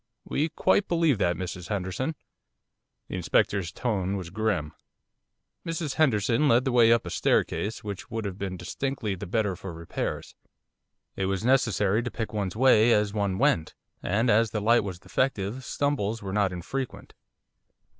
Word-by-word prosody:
'We 155 +3 0
quite 190 +5 +2
believe 165 - +2
that, 90 -3 +2
Mrs 90 0 -5
Henderson.' 105 - -2 0.9
The - - -4
Inspector's 95 -4 +1
tone 100 -5 -1
was 90 -3 -7
grim. 100 -7 -1 0.9
Mrs 165 -4 -3
Henderson 125 -2 +2
led 120 0 +4
the 130 - +1
way 120 -2 +6
up 115 -1 +3
a - - -5
staircase 110 +2 0
which 100 +1 -6
would 115 -1 -4
have 100 -1 -5
been 95 -2 -4
distinctly 110 +4 -3
the 90 - -6
better 105 0 0
for 95 0 -7
repairs. 85 0 -4 0.8
It 95 - -1
was 95 +2 -2
necessary 115 -5 +3
to 120 - -3
pick 110 -2 -5
one's 100 -3 -2
way 120 -2 +5
as 105 -1 +1
one 100 -3 0
went, 80 -4 +1 0.3
and 110 +6 +1
as 110 +2 +4
the 105 - -2
light 115 +3 +4
was 95 -3 -5
defective 125 +1 -1
stumbles 115 -7 -1
were 95 -1 -4
not 100 -2 +2
infrequent. 125 +9 -5
105 Hz, 160 wpm, -27 LUFS, 95-125 Hz, 0.9 s, way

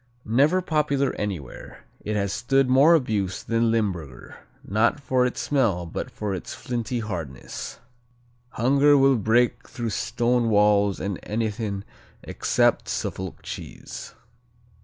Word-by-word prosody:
Never 145 +11 +3
popular 145 -5 +1
anywhere, 90 -11 -6 0.2
it 105 - -2
has 100 -1 0
stood 135 +3 +2
more 140 +6 +6
abuse 105 - -1
than 115 0 +1
Limburger, 90 - -2 0.3
not 110 +8 +2
for 130 -2 +1
its 125 - -5
smell 115 -12 +1
but 85 - -5
for 105 -2 -4
its 95 - -6
flinty 120 0 -3
hardness. 85 - -6 0.8
"Hunger 140 +4 +4
will 135 0 +5
break 120 +3 +1
through 115 -2 -4
stone 120 +2 0
walls 105 -1 +3
and 100 -2 -3
anything 105 -2 -3 0.4
except - - +1
a - - -7
Suffolk 95 -1 -4
cheese." - - -8
115 Hz, 125 wpm, -24 LUFS, 100-130 Hz, 0.8 s, more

